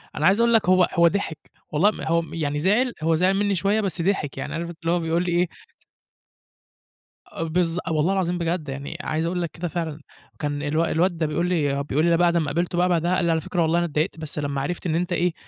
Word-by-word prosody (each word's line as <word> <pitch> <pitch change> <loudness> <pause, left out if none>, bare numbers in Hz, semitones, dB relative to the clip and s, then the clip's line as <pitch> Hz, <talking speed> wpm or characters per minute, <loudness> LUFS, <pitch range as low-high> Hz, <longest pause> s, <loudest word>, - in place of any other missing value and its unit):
أنا 150 - 0
عايز 200 +4 +4
أقول 235 0 +4
لك 220 -5 +3
هو 185 -1 +5
هو 170 -1 +5
ضحك، 165 -4 -1 0.3
والله 185 +8 +4
م - - -9
هو 170 +1 +1
م 165 - -10
يعني 150 -3 -2
زعِل 220 - +2
هو 165 0 +3
زعِل 185 +3 +3
مِنّي 205 -1 +1
شوية 200 +4 +1
بس 185 -4 -2
ضحك، 170 -6 -1
يعني - - -4
عارف 170 +1 -3
أنت 170 - -9
اللي 165 0 0
هو 175 - +2
بيقول 165 +1 0
لي 175 - -2
إيه 175 0 +2 1.8
آه 165 - -5
بالضب 170 +1 0
والله 160 +5 +2
العظيم 180 -2 0
بجد، 170 -3 -2
يعني 140 +4 -6
عايز 160 -1 -2
أقُول 175 +1 -1
لك 170 - -3
كده 175 +1 -4
فعلًا. 160 -3 -4 0.4
كان 145 -1 -2
الو 155 +3 +1
الواد 175 +1 +1
ده 160 - 0
بيقُول 170 +4 -1
لي 145 -5 0
بيقُول 150 +3 0
لي 170 -1 +4
بعد 175 -1 +3
ما 160 - +1
قابلته 170 +4 -1
بقى 180 +1 +3
بعدها 175 +1 +1
قال 180 - +1
لي: 170 - +2
"على 160 - +1
فكرة 175 +2 -2
والله 165 +1 +2
أنا 175 - +1
إتضايقت 155 +1 -2
بس 155 -1 -5
لمّا 140 -1 -2
عرفت 175 +6 -4
إن 160 - 0
أنت 175 +1 -1
إيه، 175 -1 +1
170 Hz, 250 wpm, -24 LUFS, 155-180 Hz, 1.8 s, هو